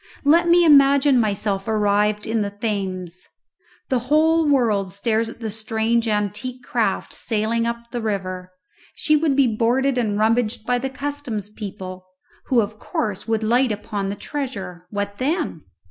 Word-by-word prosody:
Let 335 Hz, +4 st, +4 dB
me 345 Hz, 0 st, +5 dB
imagine 280 Hz, -2 st, +6 dB
myself 200 Hz, -2 st, -1 dB
arrived 210 Hz, -1 st, +1 dB
in 225 Hz, 0 st, 0 dB
the 205 Hz, -, -1 dB
Thames. 190 Hz, -4 st, -4 dB, 0.6 s
The 255 Hz, -, +2 dB
whole 320 Hz, +1 st, +4 dB
world 220 Hz, -9 st, +2 dB
stares 220 Hz, +3 st, 0 dB
at 235 Hz, -, -12 dB
the 220 Hz, -2 st, -3 dB
strange 220 Hz, +2 st, 0 dB
antique 210 Hz, +4 st, -2 dB
craft -, -, -1 dB
sailing 230 Hz, +1 st, -1 dB
up 235 Hz, 0 st, -5 dB
the 240 Hz, -, -3 dB
river; 185 Hz, -4 st, -3 dB, 0.4 s
she 305 Hz, -, +2 dB
would 300 Hz, -2 st, +2 dB
be 275 Hz, -1 st, +5 dB
boarded 255 Hz, +4 st, +2 dB
and 210 Hz, -4 st, 0 dB
rummaged 220 Hz, +1 st, +1 dB
by 245 Hz, +1 st, +1 dB
the 265 Hz, +2 st, -3 dB
customs 265 Hz, -7 st, -5 dB
people, 185 Hz, -3 st, -8 dB, 0.4 s
who 245 Hz, -3 st, +4 dB
of 215 Hz, 0 st, -5 dB
course 210 Hz, -1 st, -3 dB
would 225 Hz, -1 st, 0 dB
light 240 Hz, +3 st, +3 dB
upon 205 Hz, -1 st, -3 dB
the 200 Hz, -, -3 dB
treasure. 200 Hz, -11 st, -6 dB
What 205 Hz, -1 st, -4 dB
then? 295 Hz, -, -2 dB
225 Hz, 155 wpm, -22 LUFS, 205-260 Hz, 0.6 s, imagine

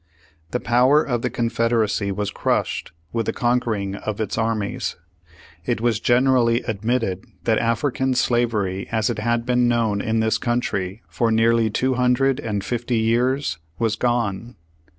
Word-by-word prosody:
The -, -, -1 dB
power 125 Hz, +6 st, +4 dB
of 120 Hz, -3 st, -1 dB
the -, -, -1 dB
Confederacy 115 Hz, -3 st, 0 dB
was 100 Hz, +1 st, -2 dB
crushed -, -, -1 dB, 0.2 s
with 115 Hz, -2 st, -1 dB
the -, -, 0 dB
conquering 115 Hz, -5 st, 0 dB
of 105 Hz, +1 st, -5 dB
its 110 Hz, -3 st, -2 dB
armies. 110 Hz, -2 st, -2 dB, 0.7 s
It -, -, -1 dB
was 115 Hz, -2 st, +1 dB
gener 130 Hz, +2 st, +3 dB
ally 115 Hz, -1 st, +2 dB
admitted 110 Hz, -3 st, -1 dB, 0.2 s
that 110 Hz, -1 st, +2 dB
African 130 Hz, +2 st, 0 dB
slavery 110 Hz, -7 st, 0 dB
as 110 Hz, 0 st, +1 dB
it 115 Hz, -, -4 dB
had 120 Hz, +1 st, 0 dB
been 125 Hz, 0 st, +2 dB
known 115 Hz, -4 st, +1 dB
in 110 Hz, +1 st, 0 dB
this 110 Hz, 0 st, +1 dB
country 110 Hz, -5 st, -2 dB
for 115 Hz, -, 0 dB
nearly 115 Hz, 0 st, +3 dB
two 130 Hz, +5 st, 0 dB
hundred 125 Hz, +2 st, +2 dB
and 105 Hz, -7 st, -3 dB
fifty 120 Hz, +2 st, -1 dB
years 120 Hz, -, +1 dB, 0.2 s
was 110 Hz, +1 st, 0 dB
gone. 120 Hz, -1 st, -1 dB
115 Hz, 150 wpm, -22 LUFS, 110-120 Hz, 0.7 s, power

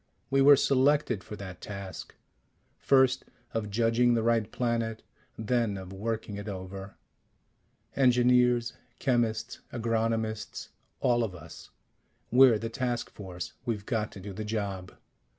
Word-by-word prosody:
We 135 Hz, 0 st, +4 dB
were 145 Hz, +1 st, +9 dB
selected 135 Hz, -4 st, +2 dB
for 105 Hz, -, -8 dB
that 95 Hz, -3 st, -9 dB
task 100 Hz, -3 st, -7 dB, 0.6 s
first 130 Hz, -1 st, +4 dB, 0.3 s
of 110 Hz, -2 st, -2 dB
judging 115 Hz, +3 st, +3 dB
the 115 Hz, -, +1 dB
right 115 Hz, -2 st, +1 dB
planet, 115 Hz, -2 st, -1 dB, 0.3 s
then 110 Hz, -2 st, 0 dB
of 95 Hz, 0 st, -8 dB
working 110 Hz, 0 st, -3 dB
it 100 Hz, +1 st, -7 dB
over. 95 Hz, 0 st, -7 dB, 1.0 s
Engineers, 125 Hz, -2 st, +4 dB, 0.2 s
chemists, 120 Hz, -4 st, 0 dB
agronomists, 115 Hz, -2 st, -2 dB, 0.3 s
all 120 Hz, -2 st, +3 dB
of 100 Hz, -5 st, -4 dB
us 80 Hz, -1 st, -12 dB, 0.6 s
we're 125 Hz, -2 st, +7 dB
the 115 Hz, -, -4 dB
task 120 Hz, +1 st, -2 dB
force. 90 Hz, -3 st, -7 dB
We've 110 Hz, -4 st, -3 dB
got 110 Hz, -4 st, -1 dB
to -, -, -9 dB
do 100 Hz, +1 st, -7 dB
the 110 Hz, -, -5 dB
job. 100 Hz, -4 st, -4 dB
115 Hz, 130 wpm, -29 LUFS, 100-120 Hz, 1.0 s, were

